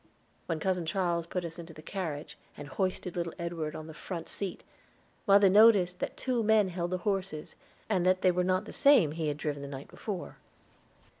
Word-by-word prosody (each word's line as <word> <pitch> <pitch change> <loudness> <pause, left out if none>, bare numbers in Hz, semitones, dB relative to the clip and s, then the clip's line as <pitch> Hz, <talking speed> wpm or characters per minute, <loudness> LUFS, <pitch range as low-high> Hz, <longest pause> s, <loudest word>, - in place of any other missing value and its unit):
When 165 -2 -1
Cousin 180 -1 -1
Charles 170 -1 0
put 180 0 -3
us 165 0 -7
into 165 -1 -9
the 155 - -12
carriage, 160 -6 -5 0.2
and 145 - -8
hoisted 185 +4 -2
little 170 -2 -3
Edward 170 -3 -4
on 155 - -6
the 160 - -9
front 165 +1 -6
seat, 195 -3 -4 0.6
mother 200 0 +7
noticed 190 -3 +6
that - - -4
two 250 -2 0
men 215 -2 +4
held 175 -1 -3
the 185 - -1
horses, 195 -6 -2 0.3
and 190 -5 +1
that 185 0 +2
they 185 - +6
were 180 +1 +1
not 185 +2 +1
the - - -9
same 275 - +5
he 160 0 -3
had 145 -1 -1
driven 150 -2 -3
the 140 - -6
night 140 0 -8
before. 195 -5 -6
180 Hz, 200 wpm, -30 LUFS, 160-195 Hz, 0.6 s, mother